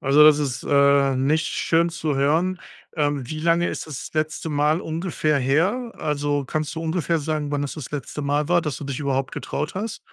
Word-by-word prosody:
Also 140 +3 +5
das 150 -1 +7
ist, 135 -4 -2
äh, 140 -1 +4
nicht 150 +5 +1
schön 170 +1 +1
zu 155 -3 -2
hören. 165 +7 +1 0.3
Ähm, 145 -5 -1
wie 155 -1 -4
lange 170 +1 +2
ist - - -5
das 150 -4 -7
letzte 155 +1 -1
Mal 150 +2 +2
ungefähr 160 -3 -1
her? 185 - +1
Also 145 -1 -1
kannst 155 +3 -3
du - - -2
ungefähr 165 0 0
sagen, 150 -1 -2
wann 145 -1 -1
es 140 - -5
das 150 -5 -7
letzte 145 +1 -5
Mal 145 +2 0
war, 175 0 +4
dass 150 -4 -3
du 145 - -7
dich 140 -1 -4
überhaupt 135 -2 -1
getraut 150 +4 -4
hast? 210 +3 -4
150 Hz, 200 wpm, -23 LUFS, 140-160 Hz, 0.3 s, das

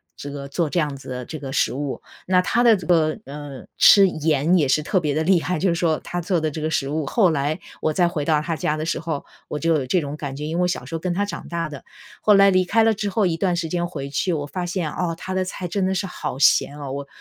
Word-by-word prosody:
这 145 - -7
个 140 -1 -6
做 155 +3 -1
这 175 - 0
样 150 -3 -1
子 135 - -11
的 125 -1 -5
这 155 +3 -7
个 135 -2 -6
食 - - +1
物。 140 0 -4 0.3
那 185 -1 +4
她 235 +6 +1
的 230 -4 +6
这 180 - -9
个， 160 -3 +2
呃， 140 -1 -8
吃 200 -1 +8
盐 155 0 +2
也 145 - +2
是 150 +3 +2
特 185 +3 +1
别 150 -4 -1
地 160 - +1
厉 180 0 +3
害， 180 +4 -1
就 190 - +2
是 170 - +1
说 165 -2 +1
她 175 0 -4
做 175 0 0
的 155 -1 -1
这 155 +1 -5
个 155 - -1
食 135 -3 0
物。 155 +1 -1
后 190 - +3
来 145 +1 -1 0.2
我 155 - +1
再 180 -2 +3
回 155 -4 -2
到 155 -1 +3
她 165 +1 -2
家 155 0 -1
的 155 - -3
时 165 - -1
候， 160 -3 -4 0.2
我 - - -3
就 165 0 +2
有 140 -4 -1
这 180 - +2
种 145 0 -5
感 140 -3 -6
觉。 150 +2 -5
因 160 +2 -3
为 180 - +1
我 180 - +2
小 180 - -3
时 - - -10
候 - - -2
跟 180 +1 -2
她 205 - +1
长 205 - -7
大 170 -1 -2
的， 145 -2 -9 0.4
后 210 - +5
来 195 0 +7
离 185 0 +3
开 225 +5 +2
了 225 0 +4
之 205 0 -3
后 205 +1 +1
一 170 -3 +1
段 180 -1 +1
时 170 -1 -2
间 175 +1 -1
回 140 -6 -6
去， 175 +6 -1
我 145 -2 -2
发 175 +5 -4
现， 175 -3 -2
哦， 170 -2 -2
她 185 - -5
的 185 0 +1
菜 185 -1 -5
真 190 +2 -1
的 190 - 0
是 195 - -1
好 155 -7 -5
咸 145 +1 +3
哦。 140 -2 -6
我 140 +1 -5
165 Hz, 320 characters per minute, -22 LUFS, 145-180 Hz, 0.4 s, 吃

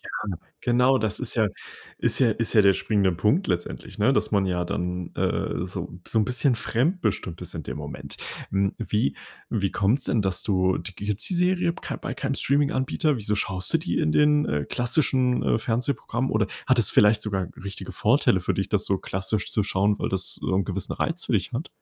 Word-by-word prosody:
Ja, - - -12 0.5
genau, 125 +2 +3
das 110 -3 -2
ist - - 0
ja 110 -2 +3 0.5
ist - - +3
ja 120 -4 +4
ist 115 +2 -1
ja 110 - +7
der 100 -1 +5
springende 100 -2 +1
Punkt 105 - +1
letztendlich, 85 0 -3
ne? 115 +6 +4
Dass - - 0
man 100 -2 +2
ja 90 -1 -1
dann, 90 0 -3
äh, 85 - -1
so 90 -1 -6
so 115 - +1
'n 105 - +2
bisschen 125 +2 +2
fremdbestimmt 115 - -1
ist - - -5
in - - -5
dem - - -5
Moment. 75 -2 -7 0.3
Hm, 100 0 +1
wie 105 -10 0 0.3
wie 100 -3 -1
kommt's 110 +7 +1
denn, 115 - +1
dass 95 -2 -1
du 95 -3 +1
d 90 - -7
gibt's 105 +1 -1
die 180 - -1
Serie 180 -1 +2
kei - - -6
bei - - -5
keinem 140 -2 -2
Streaminganbieter? 140 +1 +1
Wieso 105 -1 -1
schaust 95 -2 -1
du - - +5
die - - -2
in 75 - +1
den, 150 - +4
äh, 75 -1 -1
klassischen, 125 0 +1
äh, - - +2
Fernsehprogrammen 120 +2 -1
oder 110 -2 +1 0.2
hat 130 -2 +3
es 115 - +5
vielleicht 105 +1 +5
sogar 95 -4 -2 0.2
richtige 100 0 -6
Vorteile 115 -4 +3
für 85 - -1
dich, 95 - -2
das 105 -1 +1
so 95 - +1
klassisch 95 +2 -2
zu 105 - +2
schauen, 100 +1 +1
weil - - -1
das 95 0 0
so - - -3
'n 95 - +1
gewissen 100 -1 -2
Reiz 165 +1 -1
für - - -2
dich 105 +4 0
hat? 130 +8 -3
105 Hz, 210 wpm, -25 LUFS, 95-125 Hz, 0.5 s, ja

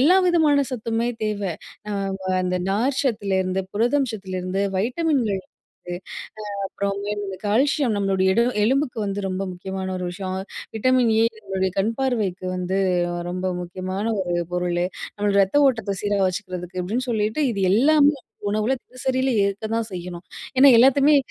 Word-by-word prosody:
எல்லா 345 +8 +6
விதமான 305 -5 +4
சத்துமே 230 0 -1 0.2
தேவ. 210 -1 -2 0.5
அ - - -2 0.3
வ 190 - -7 0.2
அந்த 180 0 0
நார் 255 +7 +1
சத்துல 190 -6 0
புரதம் 250 +4 +2
சத்திலருந்து 190 -1 -3 0.2
வைட்டமின்கள் 245 - 0
வந்து 175 - -11
அ - - -3 0.7
அப்புறம் 200 0 -2
இந்தமாரி 205 +1 -3
இந்த 190 - -5
கால்சியம் 260 +2 +2
நம்மளுடைய 190 -1 +2
எடு 235 - +3 0.2
எலும்புக்கு 260 0 +1
வந்து 200 +1 -2
ரொம்ப 185 +1 -2
முக்கியமான 190 +1 -5
ஒரு 180 - -4
விஷயம். 185 0 -4 0.4
Vitamin 255 +2 +3
A - - +5 0.2
நம்முடைய 190 -2 -1
கண் 220 +4 +1
பார்வைக்கு 215 -9 -1
வந்து 180 +1 -2 0.5
ரொம்ப 185 +1 -3
முக்கியமான 185 +3 -4 0.2
ஒரு 175 -2 -2 0.2
பொருளு. 175 0 0 0.3
நம்ம 205 0 0
ரத்த 195 +8 +2
ஓட்டத்த 225 -6 0
சீரா 205 -1 0
வச்சுக்கிறதுக்கு 185 -1 -4
அப்பிடின்னு 230 +9 -2
சொல்லிட்டு, 220 +5 0
இது 200 -4 -3
எல்லாமே 290 +6 +5 0.4
உணவுல 215 +5 +1
தினசரியில 260 +1 -1
ஏற்க 200 +2 -2
தான் 230 -1 0
செய்யணும். 180 -1 -7 0.3
ஏன்னா 275 +1 +9
எல்லாத்தையுமே 275 +4 +6
205 Hz, 145 wpm, -23 LUFS, 190-255 Hz, 0.7 s, ஏன்னா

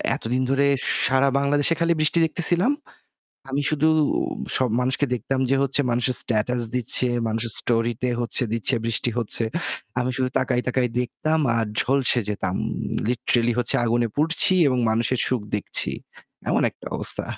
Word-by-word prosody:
এতদিন 125 +3 -2
ধরে 135 +1 +2 0.4
সারা 130 +1 +3
বাংলাদেশে 145 +3 +2
খালি 170 0 +2
বৃষ্টি 155 +2 +1
দেখতেছিলাম। 175 - +2 0.8
আমি 140 +2 -1
শুধু 155 0 +2 0.7
সব 130 - +1
মানুষকে 130 +3 0
দেখতাম 130 +2 -3
যে 135 - +3
হচ্ছে 140 +1 +1
মানুষের 120 +2 +1
স্ট্যাটাস 120 +2 -1
দিচ্ছে, 125 +1 +2 0.2
মানুষের 115 +1 +1
স্টোরি 115 0 0
তে 125 - +1
হচ্ছে 120 +1 0
দিচ্ছে 115 -2 0
বৃষ্টি 115 +1 -1
হচ্ছে। 115 0 0 0.6
আমি 125 +1 -1
শুধু 130 -1 0
তাকায়, 125 -1 0
তাকায় 125 0 0
দেখতাম 155 +6 -1 0.2
আর 115 -1 0
ঝলসে 130 -2 +1
যেতাম। 95 -3 -3 0.5
লিটরেলি 120 0 +1
হচ্ছে 120 - +1
আগুনে 120 0 +1
পুড়ছি 165 +5 +2 0.2
এবং 130 -2 0
মানুষের 115 +3 0
সুখ 130 -2 0 0.2
দেখছি, 105 - -1 0.6
এমন - - +1
একটা - - -18
অবস্থা। - - +2
125 Hz, 150 wpm, -23 LUFS, 120-140 Hz, 0.8 s, সারা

